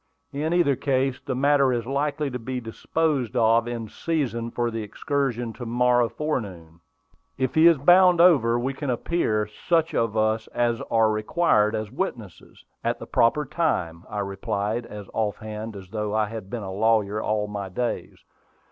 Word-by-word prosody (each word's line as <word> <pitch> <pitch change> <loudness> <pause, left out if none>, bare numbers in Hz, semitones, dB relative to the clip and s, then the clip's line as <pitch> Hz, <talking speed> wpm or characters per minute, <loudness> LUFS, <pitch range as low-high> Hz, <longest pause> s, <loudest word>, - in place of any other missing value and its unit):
"In 150 +3 -2
either 170 -6 +3
case, 135 -1 0
the 130 - -3
matter 140 0 +3
is 120 -2 -1
likely 145 +2 -1
to 125 - -4
be 125 +2 -4
disposed 130 +2 -1
of 115 0 +3
in 115 -2 -4
season 120 -5 -2
for 120 0 -2
the 115 0 -3
excursion 120 +1 -2
to 120 - -8
morrow 120 0 +3
forenoon. 95 - -4 0.6
If 130 -1 -1
he 160 +1 +6
is 170 -2 +6
bound 175 +4 +6
over, 140 -10 +5
we 130 +3 -2
can 140 0 -5
appear, 120 -4 0
such 160 +10 0
of 115 -1 0
us 110 +1 +1
as 120 -1 +1
are 110 -1 +3
required 110 -1 +2
as 110 -1 -4
witnesses, 120 - -6 0.2
at - - 0
the - - -9
proper 145 +6 +2
time," 90 - -1
I 105 -1 -3
replied, 100 +3 -3
as 105 -2 -9
off 105 -2 -1
hand 110 0 -7
as 95 -2 -10
though 105 0 -3
I 110 -1 +1
had 110 -4 -7
been 115 -1 -5
a 95 -1 -5
lawyer 105 0 +1
all 105 -1 0
my 100 -2 -5
days. 120 +6 -4
115 Hz, 175 wpm, -24 LUFS, 110-140 Hz, 0.6 s, he